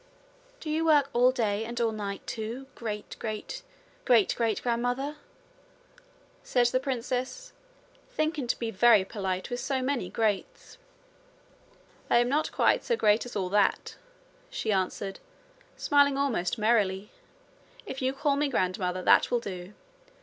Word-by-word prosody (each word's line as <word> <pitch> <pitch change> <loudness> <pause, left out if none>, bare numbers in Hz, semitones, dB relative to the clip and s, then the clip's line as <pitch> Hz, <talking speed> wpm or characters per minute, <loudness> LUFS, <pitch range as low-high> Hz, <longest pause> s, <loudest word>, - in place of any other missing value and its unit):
'Do 310 - -5
you 320 +1 +1
work 295 -4 +4
all 245 +1 +5
day 220 -4 0
and 235 +1 -5
all 230 -1 +2
night, 200 -2 -5
too, 230 +4 -5
great 210 -3 -6
great 215 -1 -5 0.4
great 230 -5 +4
great 225 -3 0
grandmother?' 245 +5 -1 1.3
said 245 -1 +2
the 250 +2 +2
princess, 260 - -3 0.6
thinking 310 - -1
to - - 0
be 230 -1 -3
very 220 -1 +5
polite 190 0 -3
with 245 - -2
so 270 0 -1
many 255 -7 -1
greats. 225 - -2 1.3
'I - - +5
am 240 +1 +3
not 300 +3 0
quite - - +2
so 475 - +1
great 215 - +3
as 245 - -10
all 190 -3 -1
that,' 200 0 +1 0.5
she 220 - -2
answered, 195 0 -2 0.6
smiling 285 -1 +3
almost 240 -10 0
merrily. 210 -2 +1 0.7
'If 265 - -6
you 260 0 +1
call 280 +1 0
me 290 0 +1
grandmother, 185 -5 -1
that - - +5
will 245 - +2
do. 190 -3 -7
235 Hz, 140 wpm, -28 LUFS, 205-270 Hz, 1.3 s, all